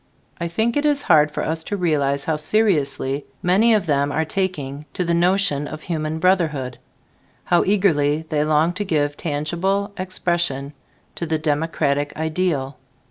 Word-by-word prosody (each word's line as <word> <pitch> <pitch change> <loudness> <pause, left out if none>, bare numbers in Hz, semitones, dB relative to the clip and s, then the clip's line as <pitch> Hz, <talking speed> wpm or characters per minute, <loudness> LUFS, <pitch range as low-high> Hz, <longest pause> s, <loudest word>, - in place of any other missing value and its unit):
I 170 - -2
think 220 +7 0
it 290 - +1
is 290 -1 +1
hard 155 -3 +5
for - - -3
us 160 +1 -1
to 205 - -3
realize 140 -6 +1
how 160 - 0
seriously 150 -7 0 0.2
many 215 +6 +4
of 205 -5 0
them 145 -2 +1
are 160 +2 0
taking 150 -6 -3
to 180 - -1
the 170 - +1
notion 175 -4 +2
of 155 +1 -8
human 155 -2 -2
brotherhood, 160 -8 +1 0.6
how 175 - +3
eagerly 160 -7 +2
they 150 -1 +1
long 155 +3 +2
to 205 +3 -3
give 145 -6 0
tangible 175 +7 -1
expression 170 -6 -1 0.4
to 170 - -4
the 160 0 0
democratic 150 -2 -1
ideal. 155 -5 -1
160 Hz, 155 wpm, -21 LUFS, 145-185 Hz, 0.6 s, hard